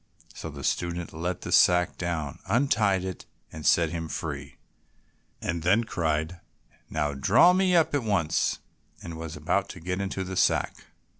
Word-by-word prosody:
So - - -7
the - - -9
student 85 -1 -2
let 85 +2 -3
the - - -6
sack 90 -1 +4
down, 80 -5 -3
untied 105 -7 +2
it, 95 -3 -6 0.2
and 80 -1 -8
set 85 -2 +4
him 80 -1 -4
free, 70 -3 -5 0.8
and 85 0 -3
then 100 +8 +3
cried, 80 -4 -2 0.5
"Now 75 -1 -1
draw 115 - +5
me 185 -1 +3
up 165 -3 +3
at 145 - +2
once," 100 -8 +1 0.5
and 85 - -7
was 80 -1 -6
about - - -1
to - - -8
get 90 +3 -3
into 95 -1 -3
the 95 0 -6
sack. - - +1
85 Hz, 160 wpm, -27 LUFS, 80-100 Hz, 0.8 s, draw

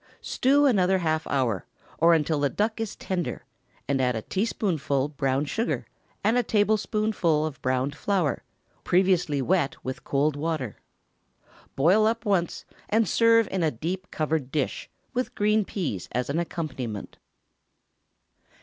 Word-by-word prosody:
Stew 285 +3 +2
another 190 -7 +4
half 160 -3 -1
hour, 125 -8 0 0.4
or 165 +1 +6
until 155 -1 +1
the 145 -1 +2
duck 220 +5 -1
is 225 - -4
tender, 180 -3 -3 0.4
and 135 -1 +1
add 125 -1 +1
a 110 - -3
teaspoonful 160 - -1
brown 135 -1 0
sugar, 225 - -2 0.4
and 225 +4 +3
a - - +4
tablespoonful 210 -6 +1
of 150 -4 -6
browned 130 +2 0
flour, 180 -2 0 0.4
previously 175 -6 +2
wet 170 -2 +1
with 130 0 -5
cold 145 +1 +1
water. 150 -6 -3 1.0
Boil 185 +10 +4
up 230 +1 -1
once, 185 -5 0 0.2
and 220 0 +3
serve 230 +3 +4
in 190 - -1
a 160 - +3
deep 180 +9 -4
covered 155 -4 -1
dish, 150 -3 -2 0.2
with 250 +1 -2
green 210 +1 +3
peas 155 - -4
as 125 +3 -1
an 160 - 0
accompaniment. 130 - -5
165 Hz, 140 wpm, -26 LUFS, 140-205 Hz, 1.0 s, or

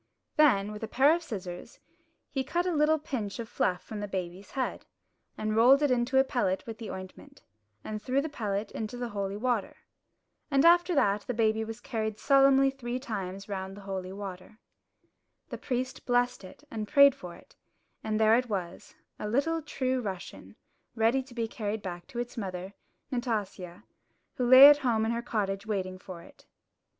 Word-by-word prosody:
Then, 210 -10 +4
with 210 - -8
a 220 - -3
pair 275 +7 +4
of 340 - -1
scissors, 190 - -7 0.5
he 270 -2 -1
cut 345 +6 -1
a 365 - 0
little 305 +1 +3
pinch 240 -9 -4
of 235 -2 -5
fluff 180 -4 -1
from 215 - -7
the 205 - -4
baby's 185 0 -5
head, 265 -2 -3 0.5
and 215 0 -2
rolled 260 +6 +6
it 290 - +3
into 250 +2 +1
a 265 - +7
pellet 195 -8 -1
with 225 -1 -8
the 225 - -6
ointment, 190 +9 -10 0.4
and 215 -1 -5
threw 260 +3 0
the 295 - -1
pellet 210 -7 -3
into 225 +2 -5
the 245 -1 -4
holy 200 -2 -3
water. 235 -2 -1 0.7
And 275 +1 +3
after 345 +1 +5
that 205 -6 +2
the 250 - -2
baby 220 -1 +2
was 225 +1 -7
carried 220 -3 -3
solemnly 275 0 +5
three 250 -2 -4
times 195 -6 -5
round 195 -1 -5
the - - -10
holy 190 -1 -5
water. 195 +1 -8 0.9
The - - -6
priest 255 0 -4
blessed 245 -2 +1
it 185 +9 -13
and 215 -2 -4
prayed 280 0 +7
for 180 -10 -10
it; - - -19 0.5
and 215 0 -1
there 220 0 +5
it 250 0 0
was, 185 -4 -5 0.2
a 210 - -4
little 320 +8 +1
true 260 -4 -2
Russian, 195 -4 -7 0.4
ready 230 +4 +2
to 255 -2 -15
be 230 -2 -1
carried 215 -2 -4
back 175 -2 -6
to - - -10
its 240 +1 -4
mother, 190 -2 -5 0.4
Nastasia, 205 -7 -3 0.5
who 245 -1 -1
lay 260 +2 +11
at 290 0 +7
home 230 -5 +1
in 225 - 0
her 235 0 -2
cottage 200 -3 -2
waiting 185 -3 -3
for 180 -3 -10
it. - - -19
225 Hz, 185 wpm, -29 LUFS, 200-260 Hz, 0.9 s, lay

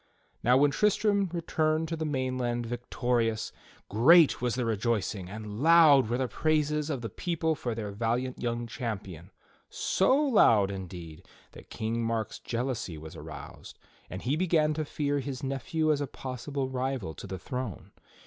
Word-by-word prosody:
Now 125 +2 +4
when 145 +1 +4
Tristram 205 +2 +2
returned 160 -2 0
to 165 - -2
the 160 0 -3
mainland 130 -4 -1
victorious, 120 -1 -1 0.4
great 150 - +6
was 125 -2 0
the 125 -1 -1
rejoicing, 110 -4 -1
and 105 +1 -7
loud 155 -6 +6
were 120 - 0
the 130 0 0
praises 150 +3 0
of 140 -5 -2
the 115 - -3
people 160 - -1
for 120 -6 -4
their 105 -3 -4
valiant 120 +4 -2
young 120 0 -2
champion 100 -7 -6 0.3
— - - -41 0.2
so 190 +8 +4
loud, 115 - +4
indeed, 90 -3 -8 0.2
that - - -14
King 115 +1 -2
Mark's 115 -1 -2
jeal 120 +1 -3
ousy 110 -10 -4
was 80 +1 -10
aroused, 75 -2 -10 0.3
and 95 - -7
he 130 +4 +1
began 160 -3 +2
to 155 0 -2
fear 145 -1 -1
his 135 -1 -5
nephew 155 +4 0
as 145 -1 +1
a 145 - -2
possible 130 +1 -4
rival 130 -8 -3
to - - -9
the 95 - -5
throne. 125 +1 -6
125 Hz, 165 wpm, -29 LUFS, 110-150 Hz, 0.4 s, great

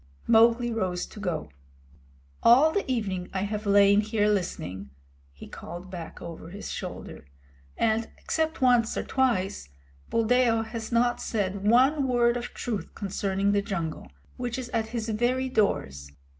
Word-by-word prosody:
Mowgli 235 +1 +4
rose 185 -5 -1
to - - -12
go. 170 - -3 0.9
"All 265 +7 +6
the 395 -7 -1
evening 190 -7 -2
I 190 - 0
have 210 +1 -3
lain 200 0 +5
here 215 -1 0
listening," 100 - -2 0.4
he 70 - -12
called 175 +3 -9
back 170 -3 -8
over 165 -1 -8
his 200 +4 -7
shoulder, - - -7 0.5
"and, 225 0 +1
except 320 -3 -2
once 245 -3 +3
or - - -1
twice, 205 - 0 0.4
Buldeo 230 0 +2
has 225 0 -6
not 240 +1 +2
said 200 -2 -2
one 265 +5 +4
word 240 -1 +3
of 240 0 -3
truth 225 -5 -4
concerning 195 0 -1
the 205 0 +2
jungle, 170 - -4 0.3
which 245 -1 -3
is 255 -2 -5
at 225 -2 -1
his 230 -1 -4
very 245 +4 0
doors. 70 - 0
220 Hz, 145 wpm, -27 LUFS, 190-240 Hz, 0.9 s, All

